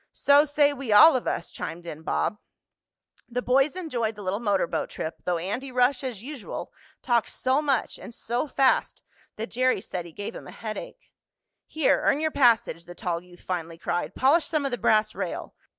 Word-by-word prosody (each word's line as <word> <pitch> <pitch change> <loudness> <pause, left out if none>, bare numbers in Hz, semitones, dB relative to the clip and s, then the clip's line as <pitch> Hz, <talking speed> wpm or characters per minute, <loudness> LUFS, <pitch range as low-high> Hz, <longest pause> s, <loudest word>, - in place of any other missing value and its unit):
"So 285 +1 +5
say 290 -1 +3
we 270 -5 -5
all 210 +10 +9
of 255 - -2
us!" - - -2
chimed 170 +1 -6
in 155 -2 -7
Bob. 210 +5 -1 0.9
The 250 +1 -2
boys 270 +4 +3
enjoyed 245 -12 -2
the 205 - -9
little 190 +2 -1
motor 205 -6 +1
boat - - -3
trip, 160 - -5
though 180 -1 +1
Andy 210 +11 -4
Rush, 250 +2 +2
as 235 -6 -5
usual, 275 -4 -7 0.3
talked 240 -3 +1
so 260 +3 +1
much 275 -6 0
and - - -9
so 240 +4 -3
fast 270 -2 +1 0.3
that 225 +2 -6
Jerry 255 -1 +2
said 180 -3 -6
he - - -12
gave 205 +7 -6
him - - -9
a - - -9
headache. 225 - -8 0.6
"Here, 310 -2 +2
earn 285 - +3
your 315 0 0
passage," 235 - +3
the 175 - -11
tall 170 -2 -2
youth 175 0 -17
finally 170 -2 -4
cried. 175 - -3
"Polish 295 +6 +3
some 305 -3 -1
of 275 - -1
the 245 - -3
brass 215 0 +3
rail. - - -5
240 Hz, 195 wpm, -26 LUFS, 190-275 Hz, 0.9 s, all